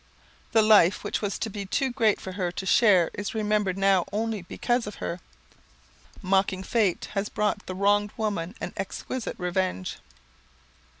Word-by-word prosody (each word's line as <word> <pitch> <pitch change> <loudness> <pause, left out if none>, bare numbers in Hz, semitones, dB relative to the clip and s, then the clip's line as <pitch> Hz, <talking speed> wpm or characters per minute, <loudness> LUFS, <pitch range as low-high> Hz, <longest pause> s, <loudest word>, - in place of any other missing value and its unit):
The 220 -1 +5
life 210 -4 +5
which - - -2
was 205 -2 -2
to - - -2
be 205 -1 -5
too 260 +7 -1
great 225 -4 +2
for 190 - -7
her 180 -2 -2
to 175 +2 -5
share 190 -4 +4
is 205 +2 -5
remembered 210 -3 0
now 195 -2 +3
only 220 0 -2
because 240 +6 -1
of 210 - -6
her. 170 - -4 1.0
Mocking 190 0 +1
Fate 205 -3 0
has 200 0 -1
brought 210 -1 -1
the 185 - -4
wronged 205 +2 +2
woman 205 -4 -2
an - - -5
exquisite 255 -3 -4
revenge. 180 - -2
205 Hz, 160 wpm, -26 LUFS, 185-215 Hz, 1.0 s, The